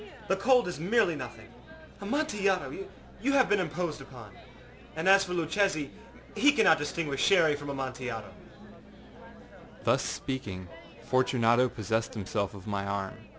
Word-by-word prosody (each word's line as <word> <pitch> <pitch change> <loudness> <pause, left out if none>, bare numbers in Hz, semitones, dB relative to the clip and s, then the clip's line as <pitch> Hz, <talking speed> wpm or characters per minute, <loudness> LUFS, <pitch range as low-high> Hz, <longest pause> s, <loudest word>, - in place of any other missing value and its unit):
The 190 - +3
cold 245 +4 +3
is 175 - -5
merely 190 0 +2
nothing. 120 -5 -8 0.5
Amontillado! 200 -6 0 0.5
You 275 +2 +1
have 265 -2 +5
been 205 - +2
imposed 170 -3 -3
upon. 125 -6 -12 0.6
And 160 +3 -2
as 195 0 +6
for 180 - -5
Luchesi, 165 -3 0 0.4
he 290 - +5
cannot 200 - +5
distinguish 145 -2 -2
Sherry 160 -6 +5
from 145 0 -7
Amontillado.â 130 -5 -5 1.5
Thus - - +3
speaking, 100 -9 -4 0.4
Fortunato 125 -1 +3
possessed 110 0 -2
himself 100 -1 -2
of 95 - -11
my 100 -2 -2
arm. 100 -1 -3
145 Hz, 130 wpm, -29 LUFS, 115-195 Hz, 1.5 s, as